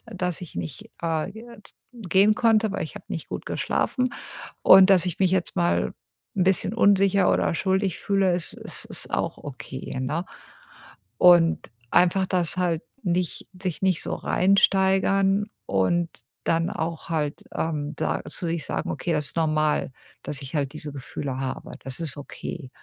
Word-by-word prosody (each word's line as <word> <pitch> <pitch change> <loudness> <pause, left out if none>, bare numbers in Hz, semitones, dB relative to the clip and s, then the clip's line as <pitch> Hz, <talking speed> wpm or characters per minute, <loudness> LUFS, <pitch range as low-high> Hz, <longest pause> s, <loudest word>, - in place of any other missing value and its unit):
dass 180 -2 -1
ich 175 - -9
nicht, 85 -2 -6
äh, 165 +2 -1
g 220 +1 -10 0.5
gehen 205 -1 +3
konnte, 220 -3 +3
weil - - -2
ich - - -8
habe - - -10
nicht - - -5
gut - - -5
geschlafen. 255 -1 -1 0.5
Und 190 +1 +8
dass 185 -2 +5
ich 175 - -3
mich 185 -2 +4
jetzt 185 -2 0
mal 85 -6 +1 0.4
'n 185 - +3
bisschen 190 +3 +3
unsicher 200 -3 +4
oder - - +1
schuldig 190 +1 0
fühle, 195 -2 +2
es 175 -1 -2
es - - -5
ist - - -5
auch - - -1
okay, 130 -1 -7
ne?“ 155 +7 -2 0.9
Und 175 -6 +5 0.2
einfach 180 +2 +4
das 180 -1 0
halt 170 -3 0 0.2
nicht 180 -3 -1
sich 185 -1 -3
nicht 185 -3 +2
so - - -2
reinsteigern 195 +1 +3 0.2
und 165 - +1 0.4
dann 165 +1 +1
auch 165 0 -4
halt, 150 -3 -2
ähm, 150 -2 -2
sa - - -1
zu 175 - -3
sich 165 -2 -2
sagen: - - -3
„Okay, 170 - -2
das 150 -2 +1
ist - - -8
normal, 155 -3 +1 0.3
dass 145 -1 -4
ich 135 - -9
halt 140 -2 -1
diese 150 -2 -7
Gefühle 135 -1 -5
habe. 130 -1 -5
Das 135 +4 -4
ist 155 -6 -2
okay.“ 145 0 -7
175 Hz, 165 wpm, -25 LUFS, 150-190 Hz, 0.9 s, Und